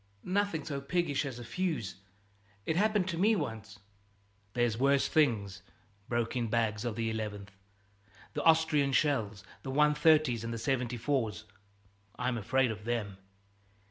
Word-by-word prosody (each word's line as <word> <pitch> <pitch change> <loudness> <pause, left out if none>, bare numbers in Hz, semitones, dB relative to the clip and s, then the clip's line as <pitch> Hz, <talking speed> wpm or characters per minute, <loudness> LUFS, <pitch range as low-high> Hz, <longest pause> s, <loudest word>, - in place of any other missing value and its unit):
"Nothing 190 -5 -1
so 140 -3 -4
piggish 150 -1 0
as 130 -3 -6
a 120 - -7
fuse. 155 - -3 0.7
It 160 - 0
happened 205 0 +2
to 170 -2 -3
me 215 +4 +4
once 115 - -5 0.4
" 100 0 -38
"There's 120 -2 +2
worse 135 +3 +3
things," 105 - +1 0.5
broke 120 0 -1
in 120 -2 0
Bags 110 -1 0
of 120 -3 -2
the 115 -1 -1
11th, 105 -2 -5 0.8
"The - - -2
Austrian 160 -4 +4
shells, 115 -8 +1 0.2
the 135 - -7
130's 150 -3 +4
and 115 - -4
the 115 - -3
74's. 120 -1 -1 0.7
I'm 125 -1 -1
afraid 130 +3 +1
of 105 -1 -7
them. 110 -4 -2
120 Hz, 140 wpm, -31 LUFS, 110-150 Hz, 0.8 s, me